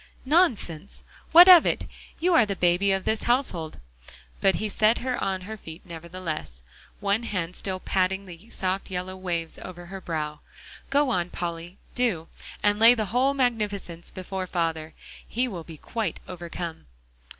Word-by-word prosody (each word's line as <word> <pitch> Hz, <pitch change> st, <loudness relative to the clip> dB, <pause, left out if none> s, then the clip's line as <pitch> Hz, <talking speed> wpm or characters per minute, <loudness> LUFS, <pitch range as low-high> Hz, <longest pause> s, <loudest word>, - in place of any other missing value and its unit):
"Nonsense! 230 Hz, -, +1 dB, 0.3 s
What 345 Hz, +3 st, +10 dB
of 360 Hz, -3 st, +10 dB
it -, -, 0 dB, 0.3 s
you 360 Hz, +2 st, +2 dB
are 285 Hz, -, +7 dB
the 205 Hz, -2 st, -2 dB
baby 180 Hz, +2 st, +3 dB
of 195 Hz, -1 st, 0 dB
this 220 Hz, 0 st, 0 dB
household." 215 Hz, -, 0 dB, 0.6 s
But 195 Hz, -, +4 dB
he 215 Hz, -, -1 dB
set 215 Hz, +3 st, +3 dB
her 255 Hz, 0 st, -2 dB
on 190 Hz, -1 st, -1 dB
her 220 Hz, +4 st, -7 dB
feet 165 Hz, -3 st, -10 dB
nevertheless, 165 Hz, -, -6 dB, 0.4 s
one 200 Hz, +2 st, +1 dB
hand 185 Hz, -6 st, -3 dB
still 190 Hz, -1 st, -3 dB
patting 190 Hz, +1 st, 0 dB
the 180 Hz, +4 st, -12 dB
soft 190 Hz, -2 st, -2 dB
yellow 185 Hz, 0 st, -4 dB
waves 170 Hz, -3 st, -4 dB
over 175 Hz, -1 st, -9 dB
her 190 Hz, +2 st, -8 dB
brow. 150 Hz, -3 st, -3 dB, 0.5 s
"Go 280 Hz, -1 st, +2 dB
on, 175 Hz, -4 st, 0 dB
Polly, 170 Hz, +1 st, -5 dB, 0.2 s
do, 215 Hz, -10 st, 0 dB, 0.3 s
and 205 Hz, 0 st, +3 dB
lay 230 Hz, +2 st, +8 dB
the 220 Hz, -2 st, -1 dB
whole 265 Hz, +3 st, +3 dB
magnificence 210 Hz, -9 st, -1 dB
before 185 Hz, 0 st, -5 dB
father. 165 Hz, -2 st, -2 dB, 0.3 s
He 250 Hz, +3 st, 0 dB
will 180 Hz, -8 st, -6 dB
be 160 Hz, -1 st, -11 dB
quite 215 Hz, +1 st, -3 dB
overcome." 170 Hz, -, -6 dB
185 Hz, 160 wpm, -26 LUFS, 170-220 Hz, 0.6 s, What